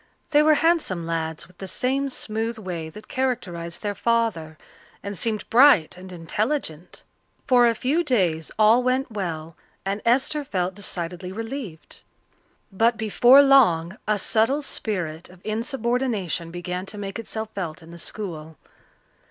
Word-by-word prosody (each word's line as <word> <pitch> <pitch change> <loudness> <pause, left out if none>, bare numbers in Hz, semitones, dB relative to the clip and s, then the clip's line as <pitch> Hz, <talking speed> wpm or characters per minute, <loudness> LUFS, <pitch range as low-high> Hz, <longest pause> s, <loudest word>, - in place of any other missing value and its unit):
They 295 -1 +6
were 310 0 +5
handsome 295 - +1
lads, 160 -1 -3
with 180 0 -23
the 195 - -6
same 270 +7 -1
smooth 225 -2 -3
way 175 -6 -5
that 210 +7 -12
characterized 180 -11 -3
their 205 -1 -1
father, 205 -8 0 0.5
and 200 0 -5
seemed 215 +2 -2
bright 240 - +6
and 185 +1 -11
intelligent. 180 - -3 0.4
For 245 -3 +5
a 230 - +2
few 285 +10 +1
days 180 - 0
all 220 +3 +6
went 255 0 0
well, 165 -6 -4 0.3
and 200 +2 -2
Esther 270 +5 +2
felt 185 -8 -2
decidedly 180 -2 -5
relieved. 225 - -7 0.7
But 225 +4 +2
before 240 +5 +6
long 190 -11 +4
a 210 0 +2
subtle 230 +8 +1
spirit 175 - -4
of 185 0 -16
insubordination 230 - -1
began 180 +2 -5
to 210 - -7
make 200 +2 -5
itself 220 -1 -5
felt 170 -4 -5
in 165 - -13
the 170 - -9
school. 160 -6 -6
210 Hz, 145 wpm, -24 LUFS, 175-245 Hz, 0.7 s, They